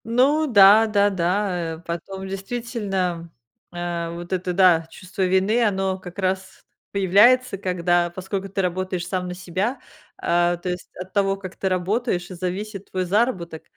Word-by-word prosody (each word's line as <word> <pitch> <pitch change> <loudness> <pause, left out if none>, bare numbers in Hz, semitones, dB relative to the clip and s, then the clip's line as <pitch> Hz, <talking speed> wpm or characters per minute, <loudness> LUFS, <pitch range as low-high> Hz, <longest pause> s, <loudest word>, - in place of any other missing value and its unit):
Ну 270 +7 +3
да, 215 -1 +7
да, 205 -1 +3
да. 180 -2 -1
Э, - - -13
потом, 190 +3 -5
действительно, 195 -5 -3 0.4
э, 175 -1 -3
вот 175 +2 -6
это, 185 0 -1
да, 175 -3 +4
чувство 185 +3 -8
вины, 190 +6 +2
оно 190 -3 0
как 180 0 -11
раз 190 0 -3 0.3
появляется, 205 +5 +4
когда, 175 -2 +1
поскольку 190 +2 -5
ты 195 +1 -1
работаешь 185 -1 -2
сам 180 -1 -2
на 180 - -5
себя, 190 +8 -2 0.4
э, 175 0 +2
то 180 - -3
есть, 180 0 -5
от 185 +1 -8
того, 195 -1 +2
как 190 -1 -9
ты 190 - -1
работаешь, 185 0 -1
и - - -5
зависит 190 +3 -5
твой 185 -1 -2
заработок. 185 -5 0
190 Hz, 155 wpm, -23 LUFS, 175-200 Hz, 0.4 s, да